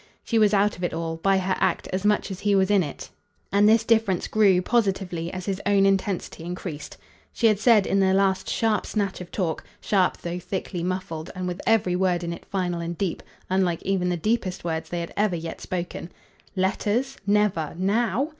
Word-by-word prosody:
She 230 - +1
was 210 -2 +5
out 205 0 +2
of 180 - -8
it 175 - -1
all, 165 0 -3
by 195 +3 +2
her 190 0 0
act, 185 -3 0
as 185 +1 -1
much 210 -1 +1
as 185 - -6
he 205 -1 +2
was 190 +1 +3
in 200 -2 +5
it; 145 -5 -6 0.4
and 205 +1 +5
this 225 0 +5
difference 220 -5 +2
grew, 200 -4 +4
positively, 185 -5 0
as 185 -1 -6
his 195 -1 -2
own 200 -1 +3
intensity 195 -3 -1
increased. 175 -3 -6 0.3
She 235 - -1
had 215 -3 +4
said 215 -3 +5
in 195 - +1
their 190 -1 +3
last 190 -1 +1
sharp 220 -2 0
snatch 200 -4 -2
of 175 - -8
talk 170 -5 -2 0.2
sharp 190 -3 +1
though 175 +1 -5
thickly 180 0 -4
muffled, 175 -3 -4
and 185 0 -3
with 180 +1 -4
every 205 -5 +3
word 180 -1 +1
in 170 0 -3
it - - -10
final 180 -3 -2
and 170 0 -4
deep, 190 -4 -2 0.3
unlike 185 -3 0
even 185 -2 0
the 175 - 0
deepest 190 0 -1
words 160 -1 -3
they 175 -1 -2
had 170 - -6
ever 205 -3 +1
yet 165 0 -6
spoken: 175 -1 -5 0.4
"Letters? 215 +7 0
Never 200 -7 +1
NOW. 230 - +1
190 Hz, 200 wpm, -25 LUFS, 175-205 Hz, 0.4 s, was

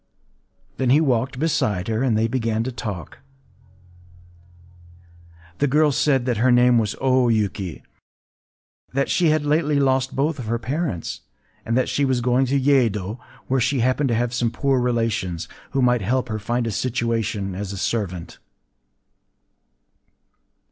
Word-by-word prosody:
Then 130 -2 0
he 140 +4 +6
walked 130 -3 0
beside 110 - 0
her; 110 0 -1
and 125 -5 +2
they 110 +1 +2
began 115 -2 -1
to 130 - -3
talk. 105 -8 -6 2.4
The 145 - +2
girl 150 +2 +3
said 135 -2 +1
that 125 -3 0
her 125 +3 +3
name 120 0 +5
was 110 -2 -1
O 130 -1 +3
Yuki; 100 -5 -1 1.1
that 140 +1 0
she 175 - +3
had 155 -1 +1
lately 150 -1 +2
lost 130 -1 +1
both 145 +2 0
of 120 - -6
her 115 +1 0
parents; 135 - -3 0.5
and 115 +2 +1
that 130 - +1
she 145 - 0
was 130 -2 +1
going 125 +2 +2
to 140 +2 +1
Yedo 115 -7 +1
(2), - - -27 0.3
where 135 +1 +1
she 135 +1 +1
happened 130 +4 +1
to 115 - +1
have 120 +1 -1
some 120 -2 +1
poor 135 +2 0
relations, 115 -8 -1 0.2
who 135 - 0
might 125 -2 +3
help 125 +5 -1
her 110 0 -3
to - - -16
find 120 +2 -1
a 115 - -2
situation 115 -4 -1
as 100 +1 -5
a 100 - -6
servant. 95 -5 -3
125 Hz, 160 wpm, -22 LUFS, 110-135 Hz, 2.4 s, he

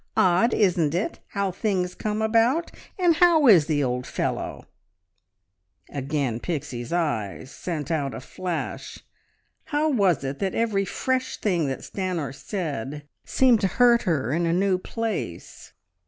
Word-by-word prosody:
Odd, 185 +6 +4
isn't 170 -6 +2
it, 185 - -2
how 200 -1 -1
things 185 -2 -1
come 215 0 -2
about? 230 +9 +2 0.3
And 350 -4 +3
how 335 -3 +5
is 180 - +7
the 145 -3 +1
old 125 0 -2
fellow?" - - -3 1.3
Again 140 -4 -2
Pixie's 125 -6 -4
eyes 130 - -2
sent 165 -3 -4
out 140 -6 -1
a - - -5
flash. 175 +5 -5 0.7
How 300 +1 +1
was 195 - +2
it 135 +1 -4
that 195 -2 -1
every 210 -4 +1
fresh 260 +6 -1
thing 175 -7 0
that 135 - -4
Stanor 180 -8 -3
said 145 - -5 0.2
seemed 250 -4 +4
to 195 - +3
hurt 240 +4 +4
her 150 - 0
in 170 +1 +1
a 165 - +1
new 185 +1 +2
place? 215 - -5
180 Hz, 140 wpm, -25 LUFS, 145-220 Hz, 1.3 s, is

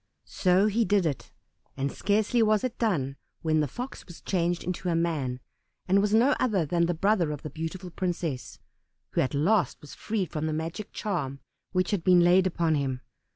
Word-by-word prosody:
So 185 +1 +2
he 215 +2 +2
did 205 -4 +2
it, 145 -5 -3 0.5
and 140 0 -1
scarcely 215 +3 +1
was 215 -2 +3
it 250 -2 -3
done 140 - 0 0.3
when 155 -1 +2
the 150 - +1
Fox 250 - -7
was 175 - -11
changed 175 -2 -1
into 180 +1 -3
a 170 - +1
man, 150 -7 -1 0.5
and 195 +1 +4
was 205 0 +1
no 235 +6 +5
other 205 -9 +1
than 170 +2 +1
the 175 - 0
brother 190 -1 +2
of 150 -1 -5
the 150 - -6
beautiful 170 +3 -5
princess, 165 -9 -3 0.5
who - - +1
at 130 - -1
last 170 - +2
was 150 - -12
freed 210 -5 -3
from 155 -1 -2
the 155 - -1
magic 165 +7 -4
charm 140 -10 -3 0.3
which 185 -1 0
had 200 -5 0
been 180 -1 +6
laid 180 +2 +5
upon 170 -3 +1
him. 135 -3 -1
175 Hz, 195 wpm, -27 LUFS, 155-200 Hz, 0.5 s, been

